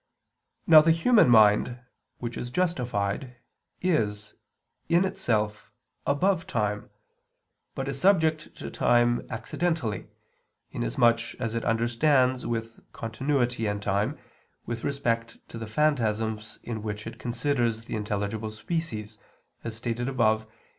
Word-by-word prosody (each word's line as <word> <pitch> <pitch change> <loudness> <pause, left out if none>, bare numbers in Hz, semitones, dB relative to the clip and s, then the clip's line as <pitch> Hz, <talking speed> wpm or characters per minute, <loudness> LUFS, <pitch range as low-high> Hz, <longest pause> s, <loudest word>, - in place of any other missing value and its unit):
Now 155 -2 +9
the 160 - +2
human 165 - +5
mind, 110 +2 +5 0.4
which 120 -1 -5
is 120 - -4
justified, 125 - -1 0.5
is, 110 - 0 0.6
in 175 +3 +4
itself, 110 - -1 0.4
above 180 +5 +1
time, 105 -2 -2 0.9
but - - -3
is - - -4
subject 160 -5 +2
to - - -7
time 120 0 +2
accidentally, 120 - -2 0.6
inasmuch 115 - +1
as 115 -3 -3
it 115 - -2
understands 125 +3 +2
with 115 -1 -4
continuity 120 0 -1
and 105 0 -1
time, 100 +1 -1 0.5
with 115 -1 -5
respect 115 -5 -1
to 115 - -7
the 115 - -6
phantasms 110 -5 0
in 115 -2 -4
which 105 0 -5
it - - -8
considers 120 -2 -1
the - - -4
intelligible 105 +1 -2
species, 110 -4 -4 0.4
as 115 -1 -5
stated 120 +2 -2
above 110 -4 +2
(I, - - -18
Q. 110 - -28
115 Hz, 125 wpm, -27 LUFS, 110-140 Hz, 0.9 s, Now